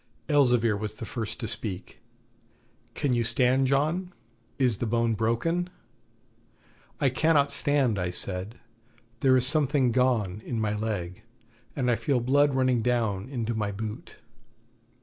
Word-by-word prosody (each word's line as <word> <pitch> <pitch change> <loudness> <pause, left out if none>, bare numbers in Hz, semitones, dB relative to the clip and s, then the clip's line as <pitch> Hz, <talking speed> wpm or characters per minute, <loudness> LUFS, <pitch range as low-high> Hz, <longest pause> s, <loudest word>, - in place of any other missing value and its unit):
Elzevir 125 -7 +3
was 105 +1 -4
the 115 - -7
first 110 0 -5
to 115 - -3
speak: 105 -3 -5 1.0
'Can 140 -3 0
you 120 -1 +1
stand, 125 +3 +2
John? 155 +7 0 0.5
Is 125 -6 +1
the 120 - -1
bone 115 0 +1
broken?' 115 - 0 1.3
'I 135 - +3
cannot 145 +1 +2
stand,' 135 -8 +1
I 90 0 -1
said; 95 +4 -2 0.6
'there 130 0 +4
is 125 - +2
something 145 -4 +2
gone 115 -6 +1
in 115 - -3
my 105 -1 -1
leg, 105 -3 -4 0.5
and 125 -3 +1
I 120 - +1
feel 125 +3 0
blood 140 +3 +2
running 130 -2 +2
down 115 -3 -1
into 120 -4 -2
my 105 -2 -2
boot.' 105 +1 -7
120 Hz, 140 wpm, -27 LUFS, 110-135 Hz, 1.3 s, there